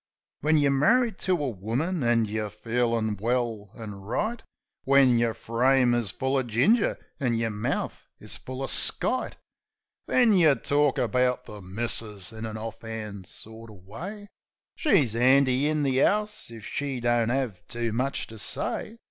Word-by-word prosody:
When 155 +2 +2
yer 145 -2 +3
marri'd 225 - +2
to 185 - 0
a 150 -5 0
woman 125 - -2
an' 120 -1 +3
yer 105 0 -3
feelin' 115 0 -1
well 115 -2 -1
an 110 -3 -7
right; 215 - -2 0.4
When 135 -3 +5
yer 115 -1 +1
frame 125 +2 +2
is 120 -4 0
full 130 0 0
uv 125 - -7
ginger 195 - +2 0.2
an' 125 -5 0
yer 115 -1 -1
mouth 105 0 -3
is - - -4
full 130 +1 -7
uv 135 - -2
skite, 255 - +4 0.7
Then 240 -4 +4
yeh 160 -7 +5
tork 145 +3 +1
about 125 +2 +1
the 105 -1 -10
"missus" 105 +1 -4
in 110 0 -6
an 110 - -6
'orf'and 110 -3 -7
sort 110 +1 -7
uv 100 -4 -15
way; 195 - -8 0.5
She's 155 - +2
'andy 130 +2 +4
in 155 -1 0
the 135 -1 +2
'ouse 210 - 0
if 115 -2 -10
she 140 -3 -3
don't 120 -1 +1
'ave 125 -7 -1
too 115 -2 -3
much 130 +4 -1
to 110 -1 -10
say. 220 - -2
120 Hz, 160 wpm, -26 LUFS, 110-140 Hz, 0.7 s, When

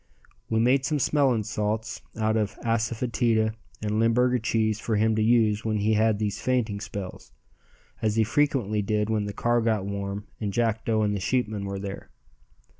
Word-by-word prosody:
We 110 - +1
made 130 +3 +3
some 150 +3 0
smelling 135 -5 +2
salts 105 +2 -2 0.2
out 110 0 +1
of 105 -2 0
asafoetida 115 -1 +1 0.3
and 105 0 0
Limburger 125 +2 +3
cheese 110 -1 0
for 110 - -1
him 110 +1 +2
to 110 - +1
use 110 -2 +3
when 110 -1 0
he 105 +2 +2
had 110 0 +3
these 105 -1 -2
fainting 115 -5 0
spells, 100 -3 -7 0.7
as 110 -1 +1
he 115 - +4
frequently 115 -4 +1
did 105 +1 0
when 105 -2 0
the 100 - -3
car 120 +3 +1
got 110 -4 0
warm 100 0 -4
and 105 -2 -2
Jackdo 110 0 +1
and 105 0 0
the - - -2
sheepmen 105 0 -1
were 100 0 -4
there. 100 0 -7
110 Hz, 175 wpm, -26 LUFS, 105-115 Hz, 0.7 s, he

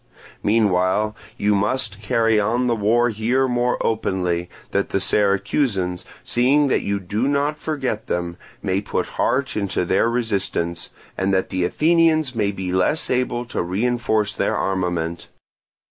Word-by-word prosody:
Meanwhile 105 0 +2 0.2
you 105 -1 +2
must 105 0 -1
carry 115 0 +2
on 115 +5 +1
the 120 -1 +2
war 115 +3 +2
here 120 +5 +1
more 125 0 +1
openly, 90 -5 -1 0.2
that 100 - 0
the 95 - 0
Syracusans, 100 -1 0 0.2
seeing 135 +4 +3
that - - +2
you 100 0 -1
do 105 +7 -1
not 145 +2 0
forget 130 -8 -3
them, 85 -1 -2 0.3
may 95 +1 0
put - - -2 0.2
heart 130 0 +1
into 100 -3 -1
their 95 +6 +2
resistance, 95 -8 -1 0.3
and 95 +1 +1
that 95 - 0
the 90 -1 0
Athenians 155 - +2
may 105 -4 0
be 95 -2 -4
less 95 +12 +1
able 125 -1 0
to 120 - -3
reinforce 110 +2 0
their - - 0
armament. 90 -3 -2
105 Hz, 145 wpm, -21 LUFS, 95-125 Hz, 0.3 s, seeing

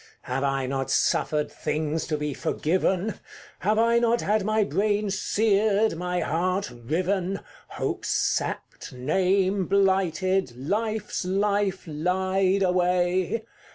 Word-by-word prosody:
Have 135 +2 -2
I 135 -1 0
not 135 0 -2
suffered 150 +2 +1
things 155 +1 -2
to 155 - -1
be 150 -1 -2
forgiven? 185 +8 0 0.4
Have 210 +3 +1
I 230 +1 +4
not 235 0 +2
had 210 0 +1
my 215 +1 +2
brain 205 0 0
seared, 210 +1 +2
my 180 +1 -2
heart 180 +2 -1
riven, 180 +10 -1 0.3
Hopes - - -3
sapped, - - -2
name 185 +8 +1
blighted, 190 -6 +1
Life's 215 - -2
life 200 0 0
lied 185 +4 +1
away? 180 +3 +1
185 Hz, 115 wpm, -25 LUFS, 160-200 Hz, 0.4 s, I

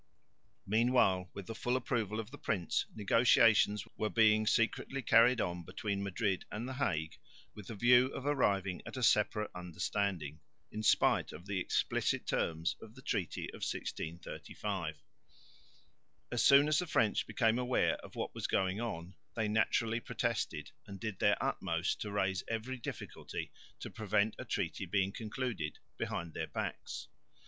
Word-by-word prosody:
Meanwhile, 110 -5 +3
with 100 - -6
the 115 - -5
full 120 +3 -1
approval 110 -5 -1
of 110 +1 -6
the 145 - -10
prince, 90 -6 -1
negotiations 110 -1 +4
were 110 - 0
being 110 -1 +4
secretly 130 +5 +1
carried 120 +2 +6
on 90 -3 -2
between 100 +3 -3
Madrid 100 0 -1
and 110 +4 -4
the 130 - -4
Hague 80 - -1 0.3
with 105 -3 -11
the 115 - -6
view 125 +4 +6
of 135 0 -6
arriving 100 -10 +1
at - - -7
a 130 - -2
separate 105 -1 +3
understanding, 90 -2 -2 0.3
in 110 - -4
spite 110 - +3
of 85 +4 -10
the 100 -1 -2
explicit - - 0
terms 80 +1 0
of 110 +1 -12
the 130 - -13
treaty 100 - -2
of - - -10
1635. 85 +2 -4 1.4
As 120 - +1
soon 140 +1 +7
as 155 -1 +3
the 180 - -2
French 110 -8 +2
became 115 0 +2
aware 125 0 +2
of - - -13
what - - -3
was - - -3
going 95 +3 0
on, 90 -6 -4 0.2
they 110 -2 0
naturally 110 +1 +1
protested 115 - -2 0.2
and 100 -1 -8
did 110 -3 -4
their - - +4
utmost 85 0 -1
to 105 - -3
raise 95 -2 0
every 115 +3 -3
difficulty 120 - -6 0.3
to - - -7
prevent 110 0 +1
a - - -5
treaty - - -2
being 95 -1 +1
concluded 110 - -4 0.2
behind 85 -2 -3
their - - -3
backs. - - -5
105 Hz, 155 wpm, -34 LUFS, 95-120 Hz, 1.4 s, soon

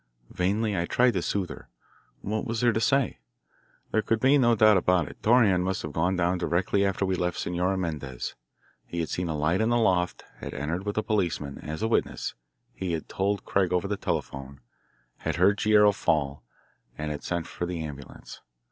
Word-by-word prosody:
Vainly 100 +4 0
I 85 -2 0
tried 125 0 +3
to 95 - 0
soothe 95 +1 -2
her. - - -11 0.5
What 110 +2 -2
was 115 0 -3
there 120 -2 +3
to 110 - 0
say? 135 - +1 0.7
There 110 - +2
could 115 +1 0
be 135 +3 +5
no 120 -2 +4
doubt 110 -1 +6
about 90 -4 +2
it. - - -12
Torreon 110 -6 +4
must 95 +1 -2
have 75 - -6
gone 90 +5 +1
down 90 0 +1
directly 90 +4 +1
after 95 0 0
we 95 - 0
left 90 -1 -1
Senora 90 +2 -1
Mendez. 75 -8 -4 0.5
He 85 - -4
had 80 - -2
seen 90 -1 -2
a 80 - -2
light 80 +7 +1
in 110 - +2
the 120 - +3
loft, 90 -6 +1
had - - -7
entered 85 +8 -3
with 105 - -2
a 110 - +1
policeman 90 -10 -1
as 80 +6 -5
a - - +2
witness, 115 - -1 0.4
he 90 -3 -3
had 80 - -3
told 100 +1 -1
Craig 95 -3 +1
over 90 +2 +1
the 105 - -1
telephone 70 -7 -4 0.6
had - - -3
heard 95 +4 +4
Guerrero 105 -1 +6
fall, 70 -7 0 0.6
and 75 0 -3
had 75 - -5
sent 85 -2 -2
for 85 - -5
the 85 -2 -4
ambulance. 70 -2 -9
90 Hz, 200 wpm, -27 LUFS, 85-105 Hz, 0.7 s, doubt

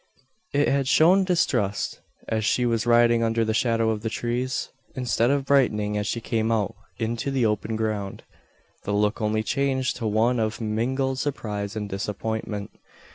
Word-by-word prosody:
It 145 +1 +2
had 135 -1 +1
shown 180 +7 +5
distrust, 135 - 0 0.3
as 110 -1 -1
she 125 +3 +2
was 115 -1 0
riding 120 0 +5
under 115 0 +1
the 110 - 0
shadow 115 -1 +2
of 105 -1 -3
the 115 - -2
trees. 120 +3 -2 0.2
Instead 125 -2 +1
of 140 -1 +1
brightening 105 -7 +2
as 105 -1 -1
she 115 - -1
came 115 -1 -1
out 105 -3 0 0.2
into 115 +3 -2
the 135 -3 +1
open 110 +1 -1
ground, 105 -3 -3 0.6
the 100 - -2
look 105 +2 +1
only 110 0 +1
changed 130 +1 0
to 115 -3 -2
one 115 +3 +2
of 110 0 -1
mingled 130 +5 -1
surprise 105 -8 -3
and 105 -1 -3
disappointment. 105 +1 -4
115 Hz, 165 wpm, -25 LUFS, 105-130 Hz, 0.6 s, shown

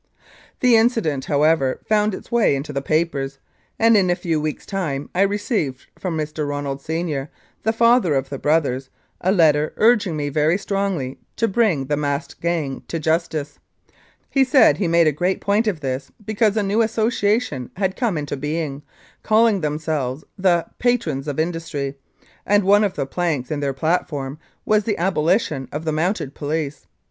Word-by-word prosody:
The 250 -2 +5
incident, 220 - +1
however, 150 -2 +2
found 210 -2 +2
its - - -12
way 235 -11 +3
into 145 +2 -5
the 140 - -1
papers, 140 -3 -1 0.4
and 230 0 +5
in 190 -3 +3
a 175 - +3
few 165 -4 -1
weeks* 155 0 -4
time 155 -8 -3
I 185 - +1
received 200 - -1
from 175 -4 -3
Mr. 150 -1 -3
Ronald, 140 -1 -3
Senior, 155 -3 -3 0.3
the 220 - +1
father 230 - +4
of 135 0 -1
the 140 - -5
brothers, 140 -4 +1 0.3
a 185 - +3
letter 155 -5 +3
urging 215 -7 +3
me 145 -1 -2
very 155 +4 +2
strongly 195 -10 -2 0.2
to 230 - +1
bring 195 - +1
the 145 +2 -1
masked 145 -1 -3
gang 165 -6 -1
to 165 - -3
justice. 160 -2 -1 0.7
He 270 - +3
said 260 -2 +5
he 195 - 0
made 170 0 +4
a 155 - +4
great 180 +6 -1
point 210 +3 +1
of 180 -8 -1
this, 130 0 -3
because 215 0 +1
a 210 - +2
new 205 +3 +1
association 220 - 0
had 190 0 -1
come 225 -9 0
into 145 -1 -3
being, 150 0 -3 0.4
calling 220 -2 +3
themselves 150 -3 -2
the 180 -3 +2
" - - -48
Patrons 170 - 0
of 145 0 -3
Industry,*' 160 -4 -2 0.5
and 205 0 +3
one 205 +2 +5
of 200 -3 0
the - - -1
planks 155 -3 -2
in 150 - -1
their 140 -1 -1
platform 150 -2 -2 0.3
was 215 0 +3
the 215 -3 0
abolition 165 - 0
of 155 +2 -5
the 160 - 0
Mounted 155 -2 -1
Police. 150 -1 -4
165 Hz, 175 wpm, -21 LUFS, 145-200 Hz, 0.7 s, The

